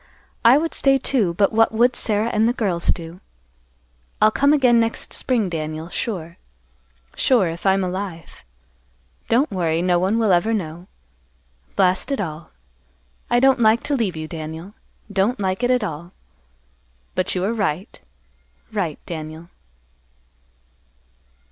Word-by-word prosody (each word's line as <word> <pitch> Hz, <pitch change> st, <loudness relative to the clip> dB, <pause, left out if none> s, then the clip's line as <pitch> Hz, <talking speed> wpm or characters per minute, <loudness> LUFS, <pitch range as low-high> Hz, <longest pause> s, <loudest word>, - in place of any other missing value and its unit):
I 240 Hz, +3 st, +7 dB
would 325 Hz, +2 st, -1 dB
stay, 270 Hz, -1 st, +3 dB
too, 225 Hz, -10 st, 0 dB
but 200 Hz, +2 st, +3 dB
what 225 Hz, +1 st, +4 dB
would 235 Hz, +2 st, +2 dB
Sarah 215 Hz, +1 st, +1 dB
and 220 Hz, +2 st, +3 dB
the -, -, +1 dB
girls 190 Hz, -9 st, -1 dB
do? 170 Hz, +1 st, -1 dB, 1.0 s
I'll 215 Hz, -, +5 dB
come 280 Hz, +5 st, +3 dB
again 255 Hz, -5 st, +4 dB
next 230 Hz, 0 st, 0 dB
spring, 235 Hz, -6 st, 0 dB
Daniel, 155 Hz, -1 st, -5 dB
sure, 170 Hz, -5 st, -4 dB, 0.8 s
sure, 235 Hz, -9 st, +3 dB
if 170 Hz, +4 st, -4 dB
I'm 190 Hz, 0 st, +3 dB
alive. 185 Hz, -2 st, -6 dB, 0.9 s
Don't 245 Hz, +4 st, +2 dB
worry, 165 Hz, -4 st, 0 dB
no 180 Hz, -1 st, +2 dB
one 190 Hz, +5 st, +1 dB
will 220 Hz, -3 st, +2 dB
ever 210 Hz, +6 st, +2 dB
know. 175 Hz, -2 st, -5 dB, 0.9 s
Blast 185 Hz, +5 st, +2 dB
it 275 Hz, -, -1 dB
all! 160 Hz, -4 st, -5 dB, 0.8 s
I 240 Hz, -, +3 dB
don't 265 Hz, 0 st, +4 dB
like 220 Hz, 0 st, +4 dB
to 290 Hz, -, -1 dB
leave 215 Hz, -9 st, -1 dB
you, 155 Hz, 0 st, -5 dB
Daniel. 160 Hz, +4 st, -7 dB, 0.4 s
Don't 205 Hz, +5 st, +1 dB
like 190 Hz, +1 st, -1 dB
it 245 Hz, -, +1 dB
at 250 Hz, -3 st, +2 dB
all. 170 Hz, -1 st, -6 dB, 1.0 s
But 185 Hz, -, -1 dB
you 180 Hz, -, -1 dB
are 210 Hz, +4 st, 0 dB
right, 190 Hz, -5 st, -3 dB, 0.7 s
right, 180 Hz, -8 st, -2 dB
Daniel." 160 Hz, 0 st, -7 dB
195 Hz, 140 wpm, -21 LUFS, 170-230 Hz, 1.0 s, I